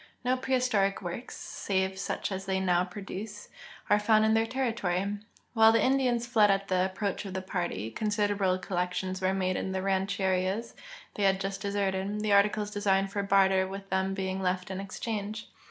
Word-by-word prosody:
No 255 +1 +3
i)rehistoric 250 -7 +1
works, 175 +8 -6
save 190 -1 -2
such 195 - -3
as 190 0 -4
they 190 0 +1
now 180 -2 +2
produce, 200 +2 -7 0.4
are 205 - +4
found 215 +1 +4
in 220 - +3
their 225 0 +2
territory. 205 -6 -1 0.3
While 220 -1 +7
the 225 -1 +3
Indians 255 -3 +2
fled 220 -4 +4
at 195 0 +1
the - - 0 0.2
ap 185 - -16
})roach 200 -1 -1
of 190 -1 -6
the 190 - -2
party, 175 - -3
considerable 205 - +1
collections 185 0 -2
were 190 +1 +1
made 185 -1 0
in 190 - -3
the 190 0 -2
rancherias 190 +2 0 0.4
they - - -5
had 195 -1 +3
just 195 0 -4
deserted, 200 0 -1
the 210 -1 +1
articles 205 +1 +3
designed 195 -2 +1
for 200 - -1
barter 195 -1 +3
with 195 +1 -8
them 190 0 0
being 190 0 -2
left 185 0 -1
in 190 - -4
exchange. 210 +2 -5
195 Hz, 180 wpm, -29 LUFS, 190-210 Hz, 0.4 s, While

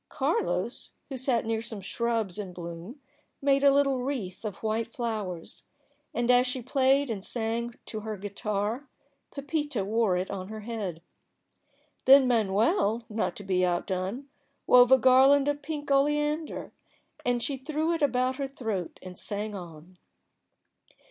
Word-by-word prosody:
Carlos, 210 - -1 0.2
who 270 - -4
sat 250 -3 0
near 225 0 -1
some 225 -2 -6
shrubs 220 -1 -2
in 190 -3 -5
bloom, 170 - -8 0.4
made 275 0 +2
a 280 - +7
little 275 -2 +3
wreath 245 -9 -4
of 215 -1 -6
white 225 +1 -1
flowers, 215 -9 -4 0.5
and 240 +1 +1
as 250 +1 +5
she 250 +1 -1
played 270 +1 +2
and 200 -4 -4
sang 235 +1 -2
to 220 - -5
her 215 0 -5
guitar, 205 +6 -3 0.4
Pepita 290 -6 -2
wore 215 -3 +2
it 185 +1 -3
on 190 -2 -5
her 215 +1 -7
head. 205 -7 -5 1.0
Then 270 0 +8
Manuel, 225 - +2
not 215 0 -1
to 205 - -7
be 185 -2 +1
outdone, 185 +8 -1 0.4
wove 250 0 +7
a 265 - +9
garland 265 +3 +6
of 290 0 0
pink 290 -1 -5
oleander, 295 +3 +1 0.5
and 245 -1 0
she 280 - -2
threw 310 +5 -1
it 330 - -2
about 255 -2 +1
her 275 -1 -2
throat 225 - -4
and 185 -1 -9
sang 210 0 -4
on. 175 -1 -10
235 Hz, 150 wpm, -28 LUFS, 200-270 Hz, 1.0 s, a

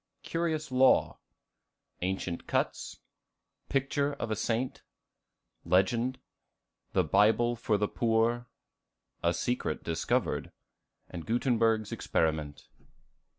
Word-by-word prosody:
Curious 160 -3 -2
Law. 130 +1 +4 0.8
Ancient 90 -1 -3
Cuts. - - -2 0.7
Picture 140 +1 0
of 115 -5 -4
a - - +1
Saint. 115 +4 -2 0.8
Legend. 115 +9 +2 0.8
The 95 - +3
Bible 110 +8 +3
for 115 -2 0
the 105 +1 +1
Poor. 115 +2 +1 0.7
A 85 - +2
Secret 90 -2 -2
discovered. 85 -1 -1 0.6
Gutenberg's 115 - +1
Experiment. 75 -4 -1
115 Hz, 85 wpm, -30 LUFS, 95-125 Hz, 0.8 s, Law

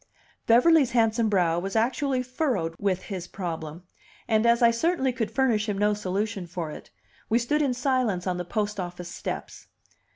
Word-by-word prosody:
Beverly's 270 +4 +5
handsome 225 -1 +2
brow 175 -4 +2
was 195 +3 -5
actually 255 +3 +1
furrowed 255 - -1
with 185 -2 0
his 185 -4 -6
problem; 165 -3 -6 0.4
and, 220 +1 +2
as 235 +1 +4
I 235 - +7
certainly 265 +1 0
could 230 -4 -2
furnish 225 -3 +1
him 200 - -1
no 210 +1 +2
solution 205 -1 -3
for 170 -2 -5
it, - - -10 0.4
we 225 - +3
stood 270 +6 +1
in 270 -4 +1
silence 250 -8 0
on 180 -2 -1
the 180 - -3
post 210 +2 -2
office 175 -1 -6
steps. - - -6
215 Hz, 170 wpm, -26 LUFS, 180-250 Hz, 0.4 s, I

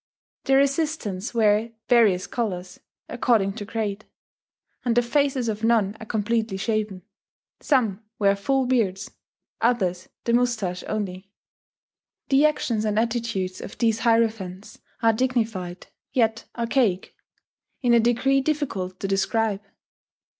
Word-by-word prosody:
Their 270 0 +4
assistants 275 - -1
wear 220 +1 +2
various 215 -7 +4
colours, 185 -6 -4 0.3
according 225 -5 +1
to 205 - -5
grade; 215 -1 -3 0.8
and 240 -2 +1
the 245 - +5
faces 270 0 +1
of 215 0 -3
none 220 -3 +2
are 220 - -9
completely 220 -1 -1
shaven; 210 -3 -2 0.6
some 225 -8 +1
wear 200 -1 +3
full 265 +6 0
beards, 220 -6 0 0.5
others 190 -7 0
the 235 - 0
mustache 220 -7 0
only. 195 -3 -4 1.0
The 280 +2 +5
actions 235 -7 -1
and 210 -1 0
attitudes 225 -5 -1
of - - -9
these 225 -2 +2
hierophants 220 -5 0 0.2
are 225 0 +5
dignified, 220 -7 -1 0.3
yet 225 -3 +1
archaic, 230 -5 0 0.7
in 240 -1 +4
a 235 - +6
degree 245 +4 +2
difficult 260 -12 -2
to 195 - -1
describe. 200 +1 0
225 Hz, 120 wpm, -24 LUFS, 195-240 Hz, 1.0 s, a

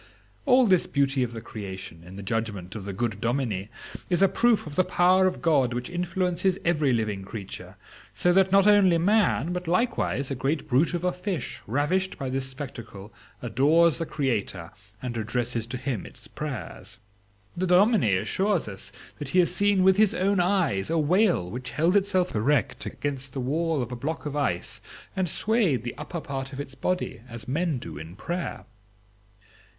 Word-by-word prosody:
All 255 -1 +6
this 185 -5 +3
beauty 140 -1 +1
of 125 -2 0
the 115 -1 -7
creation, 95 -6 -8
in 90 +2 -11
the 100 - -7
judgment 100 -3 -3
of 105 -3 -7
the 100 - -4
good 110 +1 -3
dominie, 115 -5 -1 0.4
is 180 +1 +3
a - - +7
proof 235 +3 +2
of 150 - -7
the 185 - +4
power 185 +1 +4
of 185 - -3
God 135 -7 +3
which 125 +6 -4
influences 180 +1 0
every 155 -5 +2
living 110 -4 -1
creature, 100 0 -8 0.4
so 175 - +2
that 190 0 +4
not 195 0 +5
only 200 -4 +6
man, 180 - +2
but 180 -1 -4
likewise 180 - 0
a - - +1
great 135 +4 -2
brute 150 +6 +2
of 175 - -3
a 180 - +2
fish, 180 - -4
ravished 150 - 0
by 130 -2 -4
this 135 0 -1
spectacle, 115 -7 -8 0.3
adores 150 +8 +3
the 165 - -2
Creator 105 - -2 0.3
and 120 -2 -3
addresses 115 +1 -1
to 125 +2 -4
him 125 -6 -3
its - - -8
prayers. - - -6 0.6
The 185 +2 -1
dominie 180 - +4
assures 190 - 0
us 100 0 -5 0.3
that 145 -3 -4
he 180 - 0
has 175 - 0
seen 200 -2 +3
with 190 0 +5
his 215 +1 +4
own 195 +1 +2
eyes 175 - +1
a 165 - +1
whale 175 - +3
which 125 +2 -5
held 165 +7 +2
itself 190 -2 +2
erect 125 +5 0
against 135 -2 -4
the 135 - -4
wall 155 +2 0
of 120 - -7
a - - -3
block 155 +7 -4
of 145 -1 -4
ice, 140 -12 -1 0.3
and 185 -3 0
swayed 195 - +1
the 120 - -4
upper 170 -2 -5
part 135 -1 -5
of 135 - -6
its 140 -2 -6
body 180 +1 -2
as 115 -1 -8
men 155 +2 0
do 80 -10 -8
in 80 +3 -9
prayer." 175 - -4
145 Hz, 185 wpm, -26 LUFS, 120-180 Hz, 0.6 s, a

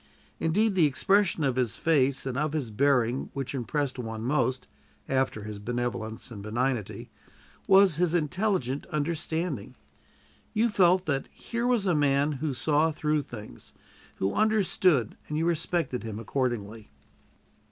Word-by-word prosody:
Indeed, 205 +7 +2
the 175 -5 +4
expression 195 +3 +2
of 130 -3 0
his 120 -6 0
face 140 -5 +2
and 130 -2 -3
of 150 +2 -1
his 140 -8 -2
bearing 125 0 +1
which 135 -1 -4
impressed 135 +1 -2
one 110 -2 -5
most, 130 -1 0 0.4
after 130 -5 0
his 105 -1 -7
benevolence 120 +1 -4
and 105 -3 -8
benignity, 115 +1 -2 0.6
was 190 -4 +6
his 175 -1 +2
intelligent 170 - -1
understanding. 160 - -3 0.8
You 230 +2 +3
felt 185 -3 +4
that 135 -3 -1
here 235 +1 -4
was 240 -5 +2
a 180 - +2
man 145 -1 +2
who 145 +1 -2
saw 150 +4 +2
through 150 0 0
things, 105 - -11 0.4
who 95 +1 -1
understood, 190 - +2
and 150 - -2
you 160 - +1
respected 170 -5 0
him 110 -2 -6
accordingly. 115 -3 -3
140 Hz, 140 wpm, -27 LUFS, 120-170 Hz, 0.8 s, was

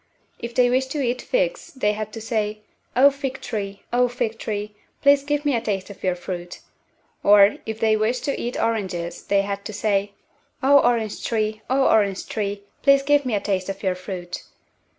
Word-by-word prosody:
If 235 0 -6
they 250 -1 +5
wished 260 +1 +1
to 295 -3 -1
eat 245 0 -1
figs - - -1
they 210 -5 +1
had 215 0 -5
to 225 - -6
say, 215 -2 -2 0.3
"O, 275 +3 +7
fig 270 -1 -4
tree, 200 -3 -5
O, 250 +1 +4
fig 240 -2 -3
tree, 210 -1 -4 0.3
please 280 0 +6
give 290 +1 -1
me 285 -3 +2
a 230 - 0
taste 200 -2 -3
of 200 - -14
your 185 -1 +1
fruit;" 175 0 -7 0.6
or, 205 0 +6
if 220 0 -4
they 220 -1 +3
wished 220 +4 0
to 280 - -1
eat 240 - -3
oranges 190 -7 -2
they 200 -1 +2
had 200 0 -4
to 215 - -5
say, 205 -1 0 0.5
"O, 280 +1 +7
orange 230 -4 0
tree, 215 -1 -1
O, 265 +1 +3
orange 200 -3 +2
tree, 200 -2 -3 0.2
please 275 -1 +5
give 290 -1 +3
me 235 - +1
a - - +1
taste 195 -2 -2
of 195 +1 -5
your 190 -2 +2
fruit." 180 -1 -6
215 Hz, 195 wpm, -23 LUFS, 200-255 Hz, 0.6 s, O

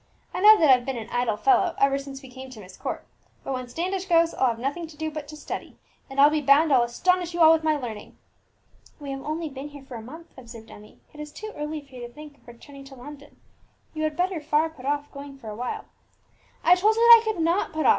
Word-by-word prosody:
I - - -3
know 425 +2 +9
that 310 -4 +5
I've 250 -1 +5
been 265 0 -4
an 225 0 -8
idle 240 -3 0
fellow 380 - +2
ever 275 0 +2
since 275 0 -9
we 260 - -12
came 260 +1 -10
to 250 -4 -12
Myst 185 -2 -13
Court; - - -5 0.4
but 270 - -4
when 255 -1 -5
Standish 360 +8 -3
goes 335 -2 +3
I'll 260 - +1
have 230 -2 -1
nothing 285 +8 -4
to 310 -1 -15
do 315 0 -3
but 300 -1 -7
to 305 +1 -10
study, 300 - -7 0.3
and 270 +1 -5
I'll 290 +2 +7
be 305 0 0
bound 285 +2 +4
I'll 255 - +5
astonish 350 +9 0
you - - -4
all 320 0 +8
with 320 -1 0
my 310 -1 +2
learning." 225 -6 -8 0.8
"We 285 -2 -7
have 270 0 -5
only 310 +3 -4
been 275 0 -8
here 285 -1 -12
for 270 - -12
a 230 - -6
month," 320 +9 -12
observed 230 -3 -12
Emmie; 210 +1 -15 0.2
"it 300 - -14
is 300 0 -7
too 430 +7 -8
early 300 +1 -5
for 275 -2 -23
you 245 -1 -7
to - - -18
think 295 +2 -13
of - - -30
returning 275 +4 -13
to 270 0 -13
London. 290 +3 -13 0.5
You 310 - -5
had 310 -1 -2
better 360 -2 -1
far 305 +2 +1
put 270 -4 -10
off 290 0 -2
going 280 -1 -10
for 230 -5 -10
a - - -7
while." 245 +3 -5 0.8
"I 350 - +6
told 415 +5 +3
you 455 - 0
that 470 0 +10
I - - -11
could 440 -5 -2
not 340 +5 +1
put 315 0 -2
off!" - - +6
290 Hz, 265 wpm, -25 LUFS, 260-325 Hz, 0.8 s, that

